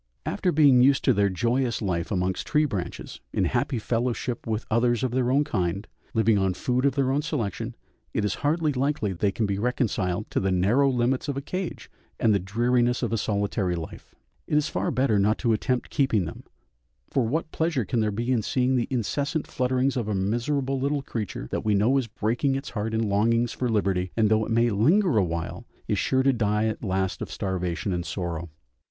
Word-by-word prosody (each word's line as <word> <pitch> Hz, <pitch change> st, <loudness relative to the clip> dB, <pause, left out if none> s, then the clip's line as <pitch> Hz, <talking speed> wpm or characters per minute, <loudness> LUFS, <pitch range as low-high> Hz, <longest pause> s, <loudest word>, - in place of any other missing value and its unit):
After 180 Hz, -, 0 dB
being 140 Hz, -5 st, +6 dB
used 135 Hz, +1 st, +4 dB
to 130 Hz, -, +5 dB
their 100 Hz, -1 st, +2 dB
joyous 120 Hz, +5 st, 0 dB
life 90 Hz, -5 st, -2 dB
amongst 95 Hz, -3 st, -1 dB
tree 150 Hz, -1 st, +3 dB
branches, 100 Hz, -11 st, -5 dB
in -, -, +1 dB
happy 125 Hz, -, 0 dB
fellowship 120 Hz, +2 st, -2 dB
with 110 Hz, 0 st, -2 dB
others 120 Hz, +2 st, +2 dB
of 130 Hz, -, 0 dB
their 125 Hz, 0 st, +1 dB
own 140 Hz, +3 st, +3 dB
kind, 95 Hz, -4 st, -2 dB, 0.3 s
living 110 Hz, -2 st, +3 dB
on 95 Hz, -1 st, +1 dB
food 125 Hz, +5 st, 0 dB
of 135 Hz, -, 0 dB
their 135 Hz, -2 st, +1 dB
own 140 Hz, +2 st, +1 dB
selection, 115 Hz, -, -3 dB, 0.4 s
it 105 Hz, -, -1 dB
is 105 Hz, -, 0 dB
hardly 155 Hz, +1 st, +1 dB
likely 130 Hz, -6 st, 0 dB
they 100 Hz, +3 st, 0 dB
can 110 Hz, +3 st, -1 dB
be 100 Hz, -1 st, -1 dB
reconciled 105 Hz, -5 st, -1 dB
to -, -, +1 dB
the 95 Hz, -, 0 dB
narrow 105 Hz, +10 st, +3 dB
limits 125 Hz, +2 st, 0 dB
of 140 Hz, -2 st, -2 dB
a -, -, -2 dB
cage 185 Hz, +4 st, -5 dB, 0.3 s
and 110 Hz, -, +4 dB
the 100 Hz, -, +3 dB
dreariness 120 Hz, +5 st, +1 dB
of -, -, -1 dB
a -, -, +1 dB
solitary 100 Hz, -3 st, -1 dB
life; 80 Hz, -2 st, -8 dB, 0.3 s
it 150 Hz, -, +2 dB
is 150 Hz, -, +2 dB
far -, -, -1 dB
better 130 Hz, -7 st, +2 dB
not 105 Hz, +2 st, +2 dB
to 115 Hz, -3 st, +1 dB
attempt 125 Hz, +3 st, -1 dB
keeping 130 Hz, -, +2 dB
them, -, -, -8 dB, 0.7 s
for 125 Hz, -4 st, +1 dB
what 155 Hz, +5 st, -2 dB
pleasure 160 Hz, -8 st, 0 dB
can 120 Hz, +1 st, -1 dB
there 110 Hz, -1 st, +1 dB
be 120 Hz, +5 st, -2 dB
in 120 Hz, -3 st, +2 dB
seeing 130 Hz, +4 st, +1 dB
the 120 Hz, -, 0 dB
incessant 140 Hz, +5 st, -1 dB
flutterings 130 Hz, +1 st, 0 dB
of 120 Hz, -5 st, -2 dB
a 105 Hz, -, -1 dB
miserable 130 Hz, +7 st, 0 dB
little 140 Hz, +1 st, -1 dB
creature 105 Hz, -, -5 dB
that -, -, -2 dB
we 105 Hz, -1 st, +2 dB
know 110 Hz, +7 st, +3 dB
is 125 Hz, -, -3 dB
breaking 115 Hz, +5 st, 0 dB
its 135 Hz, +2 st, -5 dB
heart 110 Hz, 0 st, -2 dB
in 110 Hz, 0 st, +1 dB
longings 115 Hz, +4 st, +2 dB
for 125 Hz, -, -2 dB
liberty, 95 Hz, -4 st, 0 dB
and 110 Hz, -2 st, +3 dB
though 110 Hz, 0 st, +3 dB
it 115 Hz, -, -4 dB
may 115 Hz, +1 st, +3 dB
linger 155 Hz, -, +3 dB
a 100 Hz, -, +4 dB
while 85 Hz, -1 st, -4 dB, 0.2 s
is -, -, 0 dB
sure 130 Hz, 0 st, +2 dB
to 135 Hz, 0 st, +4 dB
die 105 Hz, -2 st, +1 dB
at 110 Hz, +1 st, -2 dB
last 95 Hz, -2 st, -1 dB
of -, -, -4 dB
starvation 95 Hz, 0 st, -2 dB
and 85 Hz, 0 st, -3 dB
sorrow. 85 Hz, -2 st, -4 dB
115 Hz, 210 wpm, -26 LUFS, 100-130 Hz, 0.7 s, being